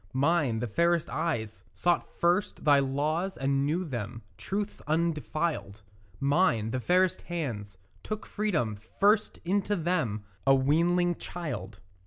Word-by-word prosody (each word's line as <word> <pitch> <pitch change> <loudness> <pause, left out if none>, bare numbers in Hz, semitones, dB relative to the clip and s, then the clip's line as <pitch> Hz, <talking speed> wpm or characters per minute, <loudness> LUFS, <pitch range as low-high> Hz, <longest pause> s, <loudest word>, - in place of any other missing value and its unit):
Mine, 140 -3 +2
the 115 - -1
fairest 170 +7 +1
eyes, 120 -10 -2
sought 175 -1 +1
first 175 +3 +1
thy 145 -2 +6
laws 150 +7 -1
and 135 +1 +1
knew 175 +5 0
them 115 - -5
Truths 200 - -4
undefiled; 155 -9 -1 0.4
Mine, 140 - +2
the 130 - -1
fairest 180 +6 +2
hands, 120 - -4 0.2
took 215 0 -5
freedom 165 - -1 0.2
first 210 +2 +3
into 200 +3 +1
them, 155 - -1 0.2
A 135 - +7
weanling 170 +6 +3
child. 115 - -6
155 Hz, 125 wpm, -29 LUFS, 125-175 Hz, 0.4 s, A